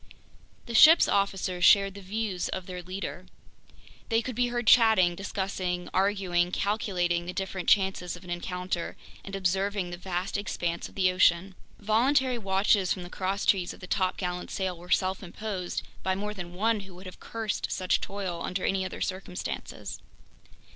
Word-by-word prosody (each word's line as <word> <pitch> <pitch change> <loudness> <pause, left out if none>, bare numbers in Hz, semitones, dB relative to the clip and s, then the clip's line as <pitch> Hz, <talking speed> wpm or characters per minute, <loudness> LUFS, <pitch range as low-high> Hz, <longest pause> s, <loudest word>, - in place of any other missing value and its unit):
The 235 - -7
ship's 315 +9 +8
officers 190 -2 0
shared 195 0 +6
the 200 - -10
views 200 -1 -2
of 185 -1 -4
their 180 -1 -6
leader. 185 0 -6 0.8
They 225 0 +2
could 255 - -4
be 245 +1 +2
heard 240 0 -2
chatting, 220 -7 +6
discussing, 185 -1 -3
arguing, 185 -3 +1
calculating 180 -4 0
the 180 - -4
different 190 -2 -3
chances 190 -3 +2
of 175 - -13
an 180 - -8
encounter, 180 0 -3 0.3
and 195 - -6
observing 195 0 0
the 175 - -5
vast 185 +2 -3
expanse 175 -4 -3
of - - -20
the 185 -2 +3
ocean. 180 +1 +3 0.2
Voluntary 250 +4 +2
watches 195 -1 +2
from 185 - -1
the 175 - -10
crosstrees 190 -1 0
of - - -19
the - - -8
topgallant 180 -1 -1
sail 190 -2 -2
were 175 +1 -13
self 185 +1 +1
imposed 190 -1 -4 0.2
by 190 0 0
more 210 +2 -3
than 175 -3 -8
one 220 +3 +1
who 195 -2 -11
would 185 +2 -12
have 185 - -10
cursed 225 -2 -3
such 185 -1 +1
toil 190 -4 -4
under 180 +2 -2
any 190 -1 +1
other 185 - -6
circumstances. 185 -1 -5
190 Hz, 165 wpm, -28 LUFS, 180-200 Hz, 0.8 s, ship's